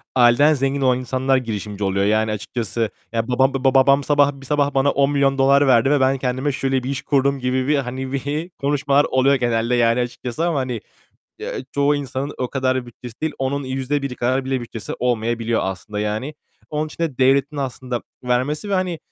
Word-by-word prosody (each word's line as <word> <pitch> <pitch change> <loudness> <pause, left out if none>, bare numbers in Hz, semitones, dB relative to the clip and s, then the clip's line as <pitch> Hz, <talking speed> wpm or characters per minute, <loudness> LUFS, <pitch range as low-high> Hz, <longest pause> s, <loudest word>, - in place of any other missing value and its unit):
aileden 130 +5 +5
zengin 135 0 -1
olan 130 -1 +3
insanlar 130 +1 +1
girişimci 105 -4 -4
oluyor. 100 +1 +1
Yani 110 +1 +2
açıkçası, 110 +1 -3 0.2
ya 115 0 -1
babam 130 +2 +2
babam 135 0 +1
babam 140 +1 +5
sabah, 145 0 +3
bir - - -11
sabah 145 0 +1
bana 135 +1 +3
$10.000.000 140 0 +3
verdi 130 +1 +4
ve 145 - +3
ben 135 +1 +2
kendime 130 +2 -1
şöyle 135 -1 -1
bir 130 - -4
iş 140 -1 -3
kurdum 140 -1 +1
gibi 130 0 -1
bir 150 - +3
hani 140 +5 -3
konuşmalar 140 0 +2
oluyor 130 +1 +3
genelde 120 -1 0
yani 115 0 +3
açıkçası 125 +4 -3
ama 160 -5 0
hani, 125 -4 -3 0.6
ya, - - -5 0.2
çoğu 140 +1 +2
insanın 140 0 -4
o 125 - -1
kadar 130 -2 -1
bütçesi 120 0 -12
değil. 160 -1 -1
Onun 135 +2 -1
%1 135 +1 -2
kadar 130 +2 0
bile 130 -1 -1
bütçesi 115 -2 -7
olmayabiliyor 115 -1 0
aslında 95 +2 -4
yani. 110 +8 -3 0.4
Onun 150 +1 -1
için 160 - -7
de 150 -6 -2
devletin 135 +3 +3
aslında 130 -3 -4 0.2
vermesi 130 +9 -1
ve - - +2
hani 185 -3 -1
130 Hz, 180 wpm, -21 LUFS, 120-140 Hz, 0.6 s, aileden